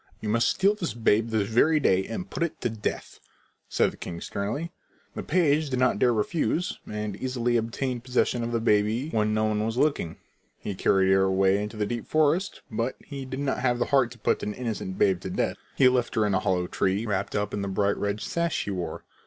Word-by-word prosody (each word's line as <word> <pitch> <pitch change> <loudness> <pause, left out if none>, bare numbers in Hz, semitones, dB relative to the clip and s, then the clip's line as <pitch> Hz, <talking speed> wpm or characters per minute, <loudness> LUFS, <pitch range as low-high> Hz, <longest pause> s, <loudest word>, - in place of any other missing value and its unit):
"You 105 - -4
must 115 +2 +3
steal 195 +2 +3
this 180 - -4
babe 115 -1 +2
this 110 -3 0
very 150 +8 +4
day 95 -9 +3
and 145 +11 -5
put - - -6
it 170 -2 -1
to 120 - 0
death," 110 -2 -4 0.5
said - - +2
the - - -15
king 85 -1 -6
sternly. 115 - -3 0.4
The - - -4
page 155 -3 +2
did 130 - -1
not 130 0 +2
dare 125 - +4
refuse, 160 - -1
and 105 -1 -3
easily 120 -1 -1
obtained 120 +2 -2
possession 125 -1 +1
of 115 - -3
the 115 - +1
baby 110 +6 +1
when 105 -1 +1
no 110 - +1
one 105 -1 +1
was 115 +2 -2
looking. 140 - 0 0.4
He 100 - -5
carried 95 0 +3
her 95 0 +5
away 95 +1 +3
into 105 +1 -5
the 105 - 0
deep 120 +1 -4
forest, 155 +5 +1
but 115 +4 -1
he 140 -2 -6
did 130 +1 -5
not 140 -1 -1
have 125 -1 +1
the 120 - +1
heart 135 -4 +5
to - - -16
put - - 0
an 105 - -3
innocent 110 -6 -4
babe 95 -2 +2
to 95 - -5
death. - - -1 0.2
He 130 - +6
left 125 -1 +1
her 110 -2 +3
in 105 - +1
a 95 - +3
hollow 90 -1 0
tree, 95 +4 0
wrapped 100 -4 -2
up 105 -1 -1
in 100 - -2
the 100 - -2
bright 100 +1 +1
red 100 +1 -2
sash 170 -1 -1
he 100 - -4
wore. 90 -2 -4
115 Hz, 225 wpm, -26 LUFS, 105-130 Hz, 0.5 s, He